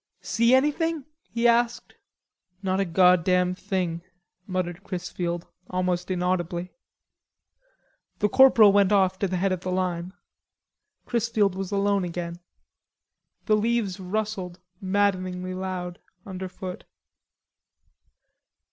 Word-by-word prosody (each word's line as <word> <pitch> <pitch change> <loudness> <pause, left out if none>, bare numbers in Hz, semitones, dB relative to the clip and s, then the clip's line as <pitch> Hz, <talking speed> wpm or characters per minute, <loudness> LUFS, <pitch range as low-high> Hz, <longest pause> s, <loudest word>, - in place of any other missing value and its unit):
"See 235 +2 +3
anything?" 300 +2 +1 0.2
he 235 +1 +1
asked. 235 0 +1 0.7
"Not 190 0 0
a 195 - +2
goddam 180 +1 +4
thing," 185 -3 -2 0.5
muttered 185 -1 -3
Chrisfield 175 -2 -4 0.2
almost 180 -1 -1
inaudibly. 180 -1 -1 1.4
The 210 - +2
corporal 225 -2 +7
went 200 -1 +4
off 190 -2 +3
to 200 - +1
the 185 0 -2
head 190 +2 +1
of 185 -2 -2
the 185 - -3
line. 180 -1 -2 0.9
Chrisfield 225 -4 +1
was 190 0 -5
alone 200 -1 +1
again. 170 0 -5 1.1
The 215 - +4
leaves 215 -3 0
rustled 190 -2 -3 0.2
maddeningly 185 -2 0
loud 185 -1 -5 0.3
underfoot. 185 -1 -7
185 Hz, 105 wpm, -25 LUFS, 180-205 Hz, 1.4 s, corporal